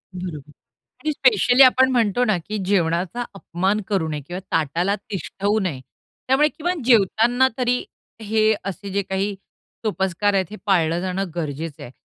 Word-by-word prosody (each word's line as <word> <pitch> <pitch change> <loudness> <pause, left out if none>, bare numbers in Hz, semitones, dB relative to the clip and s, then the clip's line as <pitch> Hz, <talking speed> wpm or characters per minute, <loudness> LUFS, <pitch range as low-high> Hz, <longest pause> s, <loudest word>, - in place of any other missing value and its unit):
बरोबर 155 -6 -7 0.5
आणि 305 +1 0
स्पेशली 250 0 +4
आपण 260 0 +6
म्हणतो 245 -1 +2
ना, 215 -5 +2
की 210 +6 -5
जेवणाचा 180 +4 0
अपमान 195 +2 -1
करू 190 -6 0
नये 150 -1 -3
किंवा 180 +3 -5
ताटाला 165 +6 +1 0.2
तिष्ठवू 200 +2 -1
नये. 165 -9 -3 0.5
त्यामुळे 280 +4 +4
किमान 340 +1 -3
जेवताना 240 +2 +4
तरी 250 0 +1 0.4
हे 220 +1 +2
असे 195 +1 -5
जे 200 +1 0
काही 195 +1 -2 0.5
सोपस्कार 195 0 0
आहेत, 190 -1 +2
हे 215 - -7
पाळलं 170 -4 +2
जाणं 185 0 -3
गरजेचं 155 -2 -5
आहे. - - -9
195 Hz, 150 wpm, -22 LUFS, 175-230 Hz, 0.5 s, आपण